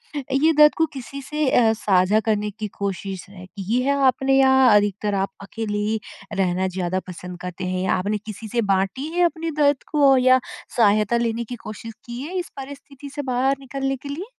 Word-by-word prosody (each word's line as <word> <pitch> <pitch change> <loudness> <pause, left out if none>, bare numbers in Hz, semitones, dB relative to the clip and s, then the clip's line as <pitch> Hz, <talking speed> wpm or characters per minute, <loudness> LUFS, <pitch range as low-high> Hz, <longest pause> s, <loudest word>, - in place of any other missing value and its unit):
अ, 285 - -3
ये 310 +4 +4
दर्द 300 0 +7
को 325 - +3
किसी 275 +1 -7
से 300 +1 -1
अ, 230 -3 +4
साझा 200 -1 +2
करने 210 -1 0
की 215 +1 -5
कोशिश 195 -1 -4
की 200 +4 -3
है 275 +2 +1
आपने? 270 +1 +2
या 265 -1 +5 0.2
अधिकतर 205 0 +1
आप 195 0 -1
अकेले 210 +1 -4
ही 215 +2 -1 0.3
रहना 185 -1 0
ज़्यादा 185 0 -2
पसंद 180 0 -8
करते 180 +1 -5
हैं? 185 0 -2
या - - +1
आपने 200 +3 -1
किसी 215 +1 -8
से 235 +2 0
बाँटी 195 +9 -1
है 355 - +4
अपने 330 -1 -2
दर्द 285 -2 +3
को? 280 -3 +5
या 255 0 +5 0.4
सहायता 215 0 +3
लेने 235 0 -1
की 245 +2 -7
कोशिश 220 +2 -7
की 240 +1 -6
है 340 +7 -5
इस 355 - -5
परिस्थिति 280 0 -9
से 290 - -2
बाहर 260 +2 +2
निकलने 270 0 -3
के 280 +2 -10
लिए? 310 +7 -5
225 Hz, 195 wpm, -22 LUFS, 200-270 Hz, 0.4 s, दर्द